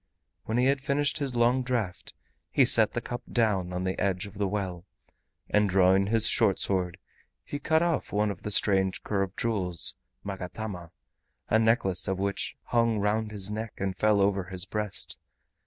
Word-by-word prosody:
When 110 - -1
he 125 - +3
had 135 0 +2
finished 140 +2 +1
his 135 -4 -2
long 120 +2 +3
draught 120 -8 -3 0.3
he - - +4
set - - +5
the - - -2
cup 120 +1 -5
down 100 -6 +1
on 90 0 -3
the 95 0 -2
edge 95 -2 0
of 100 0 -11
the 100 - +1
well, 95 -3 -3 0.6
and 105 -1 +2
drawing 95 +1 +4
his 115 +1 +2
short 105 -5 +3
sword 90 -3 -1 0.5
he 145 - -5
cut 160 +3 +2
off 170 -1 -1
one 105 0 +1
of 95 - -9
the - - -4
strange 95 -2 +2
curved 95 -2 -2
jewels 95 -7 0 0.3
(magatama), 95 -2 -6 0.6
a 110 - +4
necklace 110 -5 +2
of 95 0 -1
which 100 0 -2
hung 115 -2 +1
round 105 +2 0
his 100 -1 -3
neck 110 +1 -4
and 95 -1 -2
fell 105 +1 +3
over 100 -1 +1
his 95 -1 -5
breast. 105 -1 -3
105 Hz, 175 wpm, -28 LUFS, 95-115 Hz, 0.6 s, set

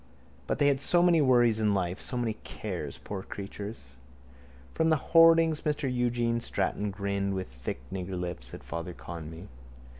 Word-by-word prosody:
_ - - -27
But - - 0
they 145 - +3
had 140 -1 +3
so 175 +4 +4
many 170 -3 +5
worries 120 -5 +4
in 105 -2 +2
life, 90 0 -1
so 125 - -2
many 120 -2 0
cares, - - -5
poor 100 -2 -6
creatures. 100 - -8 0.8
From 160 - +2
the 160 - +5 0.2
hoardings 165 -1 +6
Mr 150 0 -1
Eugene 120 -1 +1
Stratton 105 -1 -1
grimaced 100 0 -2
with 95 -1 -3
thick 65 0 -6
niggerlips 90 -8 -4
at - - -11
Father 85 +1 -5
Conmee. 80 +1 -8
105 Hz, 160 wpm, -29 LUFS, 90-130 Hz, 0.8 s, hoardings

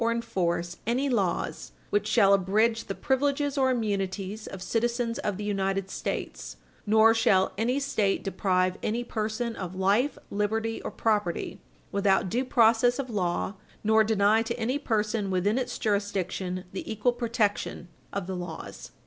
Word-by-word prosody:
306 230 0 0
enforce 175 -4 -1
any 260 +4 +1
laws 185 - -1 0.2
which 205 0 +1
shall 210 -3 +5
abridge 215 +4 +2
the 195 - -4
privilege 280 +1 0
or 265 -2 +3
immunities 205 -3 -2
of 195 - -7
citizens 235 +4 -1
of 205 -8 -2
the 210 - -5
United 195 -1 -1
States, - - -4 0.3
nor 220 +1 +6
shall 190 -4 +3
any 245 +6 +1
State 215 -8 0
deprive 185 -2 0
any 235 +3 -1
person 225 +1 -2
of 185 -1 -6
life, 200 +9 +2
liberty, 220 +2 -1
or - - -4
property 210 -6 -1 0.3
without 195 -1 +2
due 245 +7 0
process 240 -1 +4
of 265 -3 -4
law, 185 -1 -1 0.3
nor 220 +1 +5
deny 215 0 +3
to 235 +2 -3
any 250 +5 0
person 215 -5 0
within 195 +6 +1
its 255 - -3
jurisdiction 195 -3 -1
the 190 - -5
equal 220 +3 +1
protection 230 -6 -1 0.2
of 200 -2 -3
the 190 0 -4
laws." 175 -2 -7
215 Hz, 150 wpm, -27 LUFS, 195-235 Hz, 0.3 s, nor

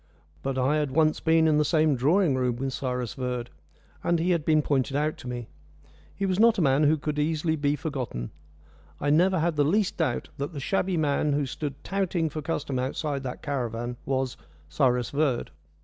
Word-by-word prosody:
But 135 -1 -2
I 135 +4 +2
had 150 -2 0
once 155 +2 +2
been 160 0 +3
in 150 -1 +3
the - - +4
same 155 -1 +3
drawing 150 +6 +3
room 125 -2 0
with 135 +2 -3
Cyrus 125 -4 -3
Verd, 125 -2 -4 0.5
and 170 - +2
he 170 +3 +1
had 170 -3 +1
been 155 -1 +3
pointed 135 -1 0
out 155 +1 0
to - - -10
me. 120 -2 -5 0.7
He 200 - -1
was 185 0 0
not 230 0 +5
a - - +2
man 140 +1 +3
who 155 +2 +4
could 150 0 -3
easily 160 +1 +1
be 145 -1 +1
forgotten. 130 - -4 0.7
I 145 - +1
never 185 +5 +4
had 165 -1 0
the 145 - +4
least 195 +7 +1
doubt 120 - -1
that 145 +4 -3
the 145 - -5
shabby 185 +4 0
man 145 -1 +1
who 145 0 +1
stood 140 +1 -5
touting 180 -5 -1
for 155 - -4
custom 140 -4 -2
outside 140 +2 -2
that 130 -2 -6
caravan 120 -4 -3
was 130 -1 -1 0.3
Cyrus 125 - +1
Verd. 140 - 0
145 Hz, 195 wpm, -27 LUFS, 130-160 Hz, 0.7 s, not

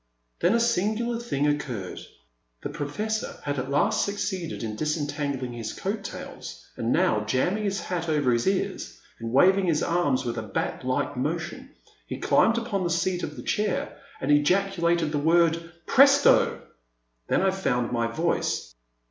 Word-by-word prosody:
Then 180 +6 +3
a - - +3
singular 230 +1 0
thing 145 -12 -1
occurred. 135 -10 -2 0.6
The - - -3
Professor 165 +9 -3
had 145 -1 -2
at 130 +1 -4
last 200 +10 +2
succeeded 190 - -3
in 110 -2 -4
disentangling 145 -3 -2
his 115 -2 -5
coat 200 +1 -3
tails, - - -8
and - - -1
now, 105 -1 +2
jamming 180 - 0
his 195 -1 -1
hat 175 -2 -3
over 145 -5 +2
his 120 -1 +1
ears, 190 -1 -2 0.2
and 115 0 -5
waving 185 +8 +4
his 160 -3 +2
arms 145 -7 +1
with 120 -1 -2
a - - -3
bat 110 - -3
like - - -1
motion, - - -3 0.4
he - - -5
climbed 225 +1 +3
upon 225 -5 -1
the 175 - 0
seat 175 +2 0
of - - -4
his 120 - -8
chair, 210 -2 -1 0.2
and 140 - 0
ejaculated 170 +1 +2
the 150 - 0
word 165 +1 +2
Presto! 275 +1 +5 0.3
" - - -48
Then - - +2
I 190 - +3
found 125 -11 -1
my 115 -1 +1
voice. 160 +9 -1
165 Hz, 165 wpm, -26 LUFS, 135-195 Hz, 0.6 s, Presto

